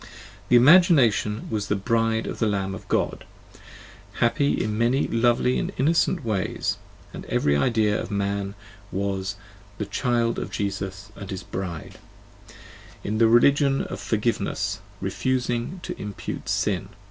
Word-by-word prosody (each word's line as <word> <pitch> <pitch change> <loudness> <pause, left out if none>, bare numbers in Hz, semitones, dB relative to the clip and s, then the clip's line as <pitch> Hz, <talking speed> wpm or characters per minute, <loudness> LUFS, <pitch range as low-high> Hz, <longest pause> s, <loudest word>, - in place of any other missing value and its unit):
The - - +5
Imagination 130 - +5
was 105 -2 -2
the 105 - +1
Bride 115 +2 0
of - - -5
the 110 - +2
Lamb 95 -2 -1
of - - -9
God, - - -1 0.9
happy 120 +6 +2
in 105 -1 -1
many 120 +5 +2
lovely 120 +2 +2
and - - -2
innocent 160 -1 +2
ways, 105 -4 -1 0.4
and - - -7
every 70 - +1
idea 110 - +2
of - - -6
man 100 0 -2 0.4
was 95 +1 -2 0.4
the 105 - -3
"child 120 0 0
of - - -4
Jesus 100 0 -4
and 100 - -9
his 95 -2 -5
Bride" 90 -4 -6 1.0
in 110 +2 -2
the 115 - +6
religion 135 +4 +4
of - - -6
for 110 - -1
giveness, 115 +2 -1 0.2
refusing 125 +5 -1
to - - -5
impute 105 -2 -6
sin. 95 -2 0
110 Hz, 140 wpm, -24 LUFS, 100-120 Hz, 1.0 s, the